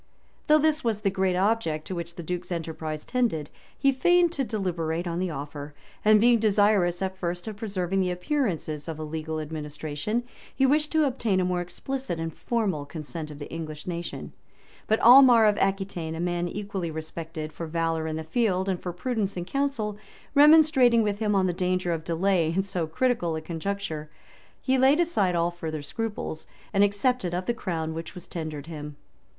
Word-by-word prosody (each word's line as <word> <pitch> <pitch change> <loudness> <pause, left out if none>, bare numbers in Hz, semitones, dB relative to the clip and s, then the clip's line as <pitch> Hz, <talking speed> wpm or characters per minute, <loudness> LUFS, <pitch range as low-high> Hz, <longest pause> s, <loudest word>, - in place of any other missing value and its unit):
] - - -37
Though 305 - +7
this 310 0 +2
was 220 -3 0
the 195 -2 +1
great 190 -1 +1
object 185 -6 +1
to - - -5
which 170 -1 -5
the 170 - -7
duke's 180 +2 -4
enterprise 160 -2 -4
tended, 220 - -1 0.3
he 275 - +3
feigned 350 +6 +4
to 280 -5 -1
deliberate 175 -7 -2
on 170 0 -2
the 185 0 -1
offer; 145 -1 -7 0.3
and 215 0 +6
being 235 +1 +5
desirous, 205 -4 +3
at 190 0 -2
first, 175 0 -4
of 215 - -4
preserving 195 -4 -1
the 185 -1 +1
appearance 190 - -1 0.2
of 160 -2 -4
a 155 - -5
legal 155 0 -4
administration, 155 +7 -3 0.3
he 270 - +3
wished 300 +3 +2
to 315 -1 +4
obtain 235 -8 0
a 185 - +1
more 180 -1 0
explicit 220 +1 -4
and 165 -1 -3
formal 205 -11 -1
consent 155 +1 -6
of 150 - -9
the 145 - -8
English 155 -2 -6
nation;[*] 175 -1 -5 0.6
but 220 - +2
Aimar 245 -2 +8
of 210 - +3
Aquitain, 190 -4 -1
a - - -6
man 175 0 -1
equally 200 -2 -4
respected 160 0 -6
for 165 - -5
valor 165 0 -1
in 155 - -3
the 160 - -4
field 190 +1 0
and 185 -2 -1
for 180 - -3
prudence 200 0 -2
in 175 - -3
council, 230 -5 -2 0.3
remonstrating 290 -6 +6
with 205 -1 -1
him 210 -2 +1
on 190 -1 +3
the 180 - +1
danger 180 0 0
of 160 -1 -4
delay 170 0 +1
in 190 +3 +1
so 185 -4 -2
critical 175 -2 0
a 160 - -3
conjuncture, 165 -2 -4 0.5
he 260 0 +1
laid 270 +5 +5
aside 210 - +2
all 170 +1 +1
further 160 -3 -5
scruples, 210 -4 -4 0.3
and 200 0 +5
accepted 205 -2 +1
of 180 +1 -2
the 240 - +1
crown 165 -7 -3
which 165 +3 -7
was 180 - -9
tendered 155 -4 -5
him. 150 -2 -7
180 Hz, 190 wpm, -26 LUFS, 160-220 Hz, 0.6 s, Aimar